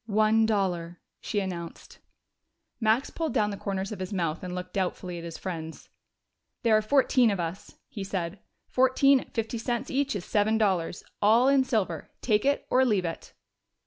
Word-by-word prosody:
"One 215 +1 +3
dollar," 180 -5 -1 0.2
she 210 - -2
announced. 175 -4 -6 0.8
Max 225 +3 +2
pulled 320 -4 -3
down 210 -3 +2
the - - -4
corners 195 0 -3
of 210 - -6
his 185 +1 -5
mouth 170 -4 -1
and 180 -1 -5
looked 180 0 -6
doubtfully 180 -2 -2
at - - -9
his 170 -1 -7
friends. 160 -4 -6 0.7
"There 225 -2 +4
are 215 - +4
fourteen 255 0 +3
of 200 -3 -1
us," 170 +2 -5
he 200 - -6
said. 190 -1 -4 0.3
"Fourteen 260 +1 +4
at - - -12
fifty 225 0 -2
cents 240 +1 -2
each 275 -2 0
is 185 - -4
seven 215 +1 +2
dollars. 185 -6 0 0.2
All 225 +5 +5
in 275 -1 +5
silver.... 210 - -1
Take 215 -2 +1
it 285 +1 +1
or 260 - +5
leave 210 -8 +2
it." 165 -1 -6
205 Hz, 175 wpm, -27 LUFS, 180-235 Hz, 0.8 s, All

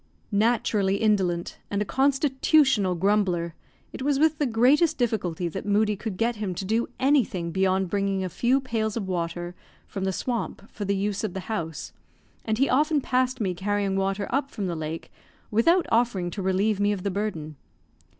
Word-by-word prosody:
Naturally 210 -2 +2
indolent, 190 -5 0
and 200 - -1
a 210 - 0
constitutional 265 - +2
grumbler, 180 -3 +1 0.4
it - - -7
was 280 +1 +1
with 315 +1 +2
the 290 - +2
greatest 275 +8 +3
difficulty 185 -8 -1
that 190 +3 -5
Moodie 210 +1 +2
could 200 -1 -5
get 230 +2 0
him 200 -4 -3
to 190 - -4
do 225 +4 0
anything 255 -11 +1
beyond 190 +1 +1
bringing 195 -1 0
a - - -1
few 245 +9 +1
pails 225 -4 -2
of 200 -4 -3
water 175 -1 -3 0.3
from 195 -2 -4
the 190 - +1
swamp 230 0 -3
for 205 - -5
the 200 +1 +1
use 200 +1 -1
of 205 -4 -3
the 190 - -3
house, 165 -8 -5 0.5
and 220 -1 -1
he 275 +3 +3
often 300 +3 +2
passed 255 -1 0
me 190 -5 0
carrying 200 +1 -1
water 195 +1 0
up 275 +2 0
from 205 - -4
the 175 -2 -2
lake 160 +1 -5 0.4
without 335 - +4
offering 225 -7 +1
to 200 - -5
relieve 190 +2 +1
me 205 0 +2
of 195 -3 -3
the 200 - -1
burden. 180 -7 -3
205 Hz, 180 wpm, -26 LUFS, 190-240 Hz, 0.5 s, without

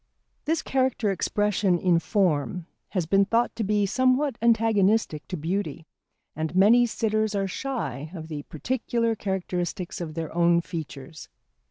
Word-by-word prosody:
This 320 +1 0
character 255 -5 +1
expression 195 0 +1
in 175 -1 +3
form 175 -3 0 0.2
has 180 -5 -1
been 195 +4 +4
thought 230 +4 +1
to 225 - -2
be 205 0 +1
somewhat 255 +5 +2
antagonistic 220 -7 +2
to 185 - -4
beauty, 165 -1 -3 0.5
and 160 +3 -3
many 230 +6 +6
sitters 215 -1 0
are 195 -1 0
shy 180 - -4
of 160 -2 -7
the 150 -2 -5
particular 230 - -1
characteristics 180 -3 -3
of 155 -2 -5
their 160 -2 -4
own 170 0 +4
features. 155 -3 -8
195 Hz, 140 wpm, -26 LUFS, 170-225 Hz, 0.5 s, many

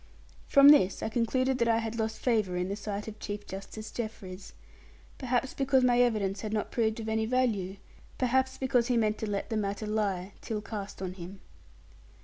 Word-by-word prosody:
From 280 0 +8
this 200 -11 +5
I - - -1
concluded 255 +3 +1
that 235 - +2
I 225 -1 +4
had 225 0 -3
lost 220 0 -1
favour 215 -7 +1
in 180 +1 -1
the 200 - -2
sight 205 0 -5
of 215 -1 -8
Chief 205 -1 -5
Justice 195 +3 -8
Jeffreys. 200 -5 -6 0.7
Perhaps 255 0 0
because 270 -1 +2
my 245 -1 +4
evidence 205 -5 +1
had 215 -1 -4
not 210 - -2
proved 220 -1 0
of 220 - -5
any 220 0 0
value! 220 -7 0 0.4
perhaps 260 +1 +1
because 255 -3 +1
he 245 -2 +2
meant 215 -1 +1
to 220 - -3
let 200 +3 -3
the 220 - 0
matter 205 0 -2
lie, 200 -3 -1
till 220 -2 -3
cast 205 -2 -6
on 185 -1 -3
him. 185 +1 -9
220 Hz, 190 wpm, -29 LUFS, 200-245 Hz, 0.7 s, From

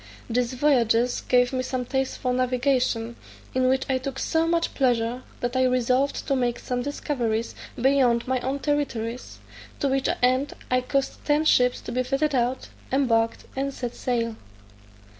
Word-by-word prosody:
These 245 +1 0
voyages 245 -3 +2
gave 245 +1 +2
me 255 - 0
some 255 -1 -3
taste 265 +1 -1
for 250 -1 -1
navigation, 250 -2 0 0.4
in 255 0 +2
which 265 0 +1
I 260 -1 +1
took 270 +1 -5
so 320 +3 +1
much 335 0 +1
pleasure, 245 -2 +1 0.2
that 245 +1 -2
I 260 0 +3
resolved 255 +2 +1
to 275 - +2
make 245 -2 0
some 250 -1 -3
discoveries 240 -5 -2 0.3
beyond 250 -2 +3
my 260 0 +1
own 265 +3 -2
territories; 255 -5 -2 0.4
to 280 - +1
which 270 0 +1
end 255 +3 +2 0.2
I 255 0 +3
caused 275 +2 -2
ten 300 +1 +2
ships 250 -4 +3
to - - -7
be 250 +1 0
fitted 275 +4 0
out, 250 0 0 0.2
embarked, 230 -4 +1
and 275 +1 -1
set 245 -3 -5
sail. 230 -3 -2
255 Hz, 160 wpm, -25 LUFS, 245-270 Hz, 0.4 s, I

